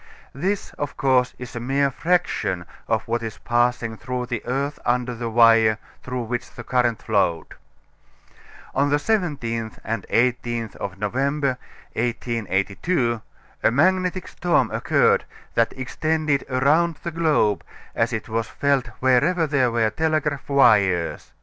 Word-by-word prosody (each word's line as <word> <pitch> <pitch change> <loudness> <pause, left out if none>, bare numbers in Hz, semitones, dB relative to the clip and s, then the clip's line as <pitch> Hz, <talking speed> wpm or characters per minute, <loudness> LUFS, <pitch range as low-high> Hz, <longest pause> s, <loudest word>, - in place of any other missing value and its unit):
This 190 +9 -2
of 145 -1 -4
course 130 -2 +2
is 125 0 -9
a - - -3
mere 135 +3 +1
fraction 160 - 0 0.2
of 110 -2 0
what 115 +1 -1
is 110 -2 -5
passing 120 -1 0
through 125 +1 -3
the 120 -2 -3
earth 140 +3 -2
under 125 0 0
the 115 0 -4
wire 115 -1 +5 0.2
through 125 -1 -4
which 120 +1 -4
the 120 - -10
current 120 -2 0
flowed. 100 -6 0 1.2
On 140 +2 +2
the 145 - +3
17th 145 - -1
and 115 -2 -3
18th 120 -2 0
of 95 -1 -5
November, 135 +5 0 0.3
1882, 115 - -1 0.4
a - - +4
magnetic 185 +7 +1
storm 175 -1 +1
occurred - - +2 0.3
that 115 -1 +2
extended 155 +2 -1
around 150 +6 +2
the 170 - -3
globe, 150 - +2 0.3
as 115 +2 +1
it 110 -2 -3
was 115 0 -2
felt 140 -3 0
wherever 150 +7 +3
there 140 -4 +2
were 115 -2 +1
telegraph 155 +1 -1
wires. 100 -11 +3
125 Hz, 135 wpm, -23 LUFS, 115-145 Hz, 1.2 s, wire